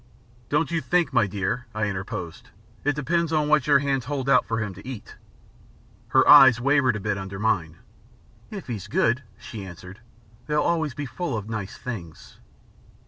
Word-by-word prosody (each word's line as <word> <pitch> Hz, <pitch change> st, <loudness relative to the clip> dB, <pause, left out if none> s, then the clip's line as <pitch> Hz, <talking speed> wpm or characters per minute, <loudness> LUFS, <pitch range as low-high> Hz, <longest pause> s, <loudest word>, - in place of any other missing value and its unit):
"Don't 150 Hz, +3 st, +1 dB
you 165 Hz, -1 st, 0 dB
think, 165 Hz, +4 st, +1 dB
my 120 Hz, -5 st, +3 dB
dear," 115 Hz, +5 st, -3 dB
I 110 Hz, 0 st, 0 dB
interposed, 95 Hz, -4 st, -5 dB, 0.3 s
"it 145 Hz, 0 st, +1 dB
depends 165 Hz, +3 st, 0 dB
on 155 Hz, -2 st, +1 dB
what 150 Hz, -2 st, +3 dB
your 145 Hz, -1 st, +6 dB
hands 135 Hz, -2 st, -1 dB
hold 135 Hz, -1 st, -3 dB
out 135 Hz, -, +4 dB
for 115 Hz, 0 st, -1 dB
him 105 Hz, -3 st, -3 dB
to 100 Hz, +6 st, -13 dB
eat?" 130 Hz, -5 st, -8 dB, 0.9 s
Her -, -, +3 dB
eyes 130 Hz, -2 st, +9 dB
wavered 130 Hz, -2 st, +3 dB
a -, -, -3 dB
bit 105 Hz, 0 st, -2 dB
under 95 Hz, 0 st, -6 dB
mine. 90 Hz, -7 st, -1 dB, 0.7 s
"If 200 Hz, -4 st, -7 dB
he's 105 Hz, -5 st, -6 dB
good," 115 Hz, +4 st, +1 dB, 0.2 s
she 110 Hz, -4 st, -8 dB
answered, 90 Hz, +1 st, -11 dB, 0.5 s
"they'll 150 Hz, 0 st, +1 dB
be -, -, -3 dB
always 160 Hz, -5 st, 0 dB
full 145 Hz, 0 st, -4 dB
of 105 Hz, -1 st, -6 dB
nice 105 Hz, -4 st, -5 dB
things." 95 Hz, -11 st, -8 dB
125 Hz, 175 wpm, -24 LUFS, 100-145 Hz, 0.9 s, eyes